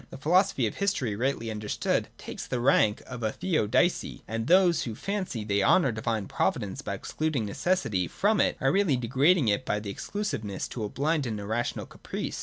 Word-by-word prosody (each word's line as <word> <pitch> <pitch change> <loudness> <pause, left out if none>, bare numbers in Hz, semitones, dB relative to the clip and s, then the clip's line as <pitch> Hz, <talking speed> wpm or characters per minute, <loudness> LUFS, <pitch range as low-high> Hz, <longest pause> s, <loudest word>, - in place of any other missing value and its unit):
The - - -9
philosophy 185 +7 +2
of - - -3
history 165 - 0
rightly 115 -1 -1
understood 105 -1 -1
takes - - -7
the 125 - -2
rank 115 -4 +3
of 125 -1 -8
a 110 -1 0
Theodicee; 170 - 0
and 115 +1 -3
those, 180 -2 +5
who 115 -3 -4
fancy 185 - -3
they 100 -1 +1
honour 140 - +4
Divine 110 -2 -2
Providence - - -1
by - - -4
excluding 155 -7 -2
necessity 105 - 0
from 205 - +2
it, - - +1
are 135 -1 +2
really 180 -7 +2
degrading 135 +5 +3
it 100 +5 +1
by 105 - -1
this 100 -1 -5
exclusiveness 110 - -4
to 115 - -5
a 105 - -2
blind 145 +2 0
and 110 -2 -3
irrational 110 +4 -2
caprice. - - -6
125 Hz, 185 wpm, -28 LUFS, 110-175 Hz, -, those